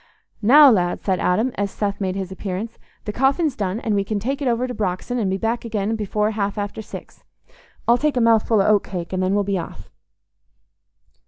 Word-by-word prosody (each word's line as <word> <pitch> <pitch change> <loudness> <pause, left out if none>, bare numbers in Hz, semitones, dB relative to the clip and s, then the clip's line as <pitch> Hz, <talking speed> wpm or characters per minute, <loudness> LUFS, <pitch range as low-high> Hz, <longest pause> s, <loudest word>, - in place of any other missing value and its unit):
"Now, 275 +6 +8
lad," 175 -5 0
said 190 -2 0
Adam, 220 +8 +1
as 200 0 0
Seth 200 0 -3
made 190 -1 -1
his 190 -1 -4
appearance, 195 +4 -5 0.3
"the 210 - -4
coffin's 270 +4 +1
done, 200 +1 -2
and 220 - -1
we 200 -1 +1
can 210 +1 -3
take 270 +8 -3
it 275 - -1
over 240 +1 +1
to 250 - -5
Brox'on, 210 +4 -2
and 205 -4 0
be 190 - 0
back 225 +4 -2
again 220 -1 -2
before 210 0 -1
half 205 -1 -2
after 205 +1 -4
six. - - -11 0.6
I'll 240 +1 +4
take 300 -3 0
a - - +4
mouthful 225 -2 +3
o' - - -1
oat 210 -1 +4
cake, 180 -2 -6
and 185 - -1
then 185 +2 +1
we'll 205 - +2
be 195 -1 -1
off." 165 - -9
210 Hz, 215 wpm, -21 LUFS, 195-235 Hz, 0.6 s, Now